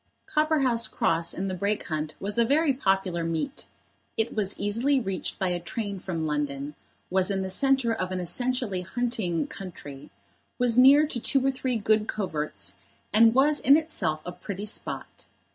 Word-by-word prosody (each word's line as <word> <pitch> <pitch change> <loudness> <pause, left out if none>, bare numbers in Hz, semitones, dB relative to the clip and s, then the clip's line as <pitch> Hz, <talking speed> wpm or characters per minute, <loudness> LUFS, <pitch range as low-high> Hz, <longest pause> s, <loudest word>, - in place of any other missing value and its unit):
Copperhouse 275 -7 +1
Cross 170 -5 0
in 195 +2 -2
the 190 - -2
Brake 200 +3 -2
Hunt 155 -1 -3
was 205 +3 -2
a - - +6
very 285 +4 +3
popular 190 -8 0
meet. 165 - -3 0.5
It 225 +1 0
was 205 -3 0
easily 235 +8 +2
reached 195 -6 -3
by 190 - 0
a 175 0 -1
train 200 +3 -5
from 170 -4 -3
London, 145 -1 -2 0.4
was 190 0 +2
in 195 -1 -1
the 190 - -4
centre 265 +2 +2
of 185 -4 -3
an 185 - -2
essentially 210 +2 -1
hunting 210 -4 -1
country, 145 -7 -9 0.5
was 245 -2 +2
near 275 +4 +7
to 280 -5 -4
two 270 +3 +2
or 270 - +3
three 255 -2 -2
good 215 0 +2
coverts, 160 -8 -3 0.4
and 225 +2 +6
was 290 +3 +4
in 280 +3 +6
itself 190 - -1
a 180 - -4
pretty 200 +2 -6
spot. 215 - -4
205 Hz, 170 wpm, -27 LUFS, 180-250 Hz, 0.5 s, near